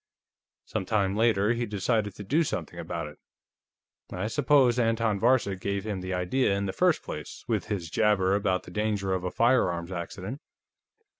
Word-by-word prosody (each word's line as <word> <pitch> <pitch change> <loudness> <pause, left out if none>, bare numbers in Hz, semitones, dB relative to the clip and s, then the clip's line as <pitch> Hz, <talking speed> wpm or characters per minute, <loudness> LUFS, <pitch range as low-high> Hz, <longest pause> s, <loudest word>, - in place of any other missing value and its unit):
Some - - -3
time 100 -3 +1
later, 110 -1 +3
he 120 0 -2
decided 105 0 -1
to 105 - -8
do 150 - +2
something - - -4
about 85 -3 -4
it. 75 - -11 0.9
I 90 +3 -3
suppose 130 -1 +3
Anton 115 -3 +1
Varcek 115 -5 +2
gave 100 +1 -2
him 100 -4 -3
the 95 0 -5
idea, 100 +4 +1
in 100 - -1
the 95 - -3
first - - +2
place, - - -7
with - - 0
his 90 -5 -3
jabber 105 -3 +3
about 100 -2 +1
the - - -12
danger 100 -1 -1
of 95 -1 -2
a 90 - -1
firearms 90 -8 +2
accident. 95 +8 -6
100 Hz, 170 wpm, -27 LUFS, 95-115 Hz, 0.9 s, later